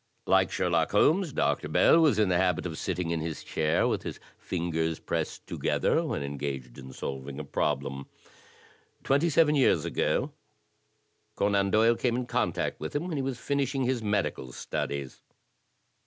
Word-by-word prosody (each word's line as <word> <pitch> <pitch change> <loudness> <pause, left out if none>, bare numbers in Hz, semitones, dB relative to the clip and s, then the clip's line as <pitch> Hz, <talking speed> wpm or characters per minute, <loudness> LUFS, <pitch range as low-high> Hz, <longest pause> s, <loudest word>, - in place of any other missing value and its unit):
Like 95 -1 +4
Sher 90 - -1
lock 85 0 +1
Holmes, 160 - +3
Dr. - - 0
Bell 165 - +5
was 150 -10 +4
in 105 -3 +3
the 90 - +3
habit 90 -1 +1
of 85 -3 -4
sitting 85 -2 -2
in 85 - 0
his 80 0 -5
chair 75 -1 +1
with - - 0
his - - -6 0.2
fingers 80 -2 -2
pressed - - -3
together - - 0
when 70 - -2
engaged 70 -3 -5
in 65 0 -10
solving 70 +1 -6
a - - -4
problem. 70 0 -2 1.0
Twenty 140 +5 +2
seven 155 -1 +4
years 140 -3 +3
ago - - 0 1.0
Conan 100 -1 +2
Doyle 110 +3 +4
came 120 0 0
in 125 0 -2
contact - - -1
with - - -6
him 160 +5 -1
when 160 - -2
he - - 0
was 135 -2 -3
finishing 135 0 -1
his 125 -1 0
medical 105 - -1
studies. 70 +1 -4
95 Hz, 165 wpm, -28 LUFS, 80-130 Hz, 1.0 s, Bell